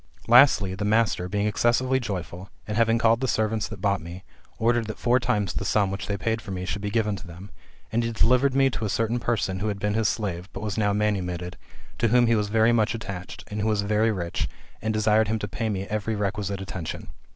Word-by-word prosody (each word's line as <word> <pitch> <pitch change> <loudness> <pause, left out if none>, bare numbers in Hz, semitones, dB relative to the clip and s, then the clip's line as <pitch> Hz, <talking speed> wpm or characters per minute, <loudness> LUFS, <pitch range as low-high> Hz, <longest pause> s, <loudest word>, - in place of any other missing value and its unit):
Lastly; 120 -6 +6
the 95 +2 -4
master 105 -4 +1
being 105 +2 0
excessively 120 +4 +2
joyful, 95 -5 -5 0.2
and 105 - -3
having 115 0 +3
called 115 +1 +3
the 130 - 0
servants 110 -2 0
that 110 -4 -9
bought 100 -3 +1
me, 85 +3 -9 0.3
ordered 115 0 +1
that 110 - -5
four 125 +1 +2
times 105 -6 0
the - - -3
sum 100 -3 +1
which 95 -2 -5
they 100 - -1
had - - -7
paid 115 0 0
for - - -12
me 90 -1 -4
should 100 +2 -4
he 105 - -1
given 105 -1 0
to 90 - -11
them; 85 +4 -11 0.4
and 115 +1 +1
he 115 - -1
delivered 125 +4 +3
me 135 0 +5
to 115 - -4
a 105 - -1
certain 115 +3 0
person 110 -6 -1
who 105 - -2
had 105 -2 -2
been 105 +1 -1
his 110 0 +2
slave, 95 -4 -3
but 95 - -6
was 105 -2 -2
now 105 -2 +1
manumitted, 90 -4 -1 0.4
to 115 - +3
whom 120 +2 +4
he 115 - +3
was 105 -2 0
very 110 +2 +4
much 110 0 +2
attached, 100 -5 -7
and 105 0 -3
who 105 - 0
was 105 -2 +1
very 110 +2 +2
rich, 85 -5 -3 0.3
and 110 - -1
desired 110 0 +3
him 110 +1 0
to 105 - -4
pay 110 +2 -3
me 95 -2 -2
every 110 +2 -2
requisite 100 -1 -2
attention. 90 -3 -5
105 Hz, 240 wpm, -25 LUFS, 100-115 Hz, 0.4 s, Lastly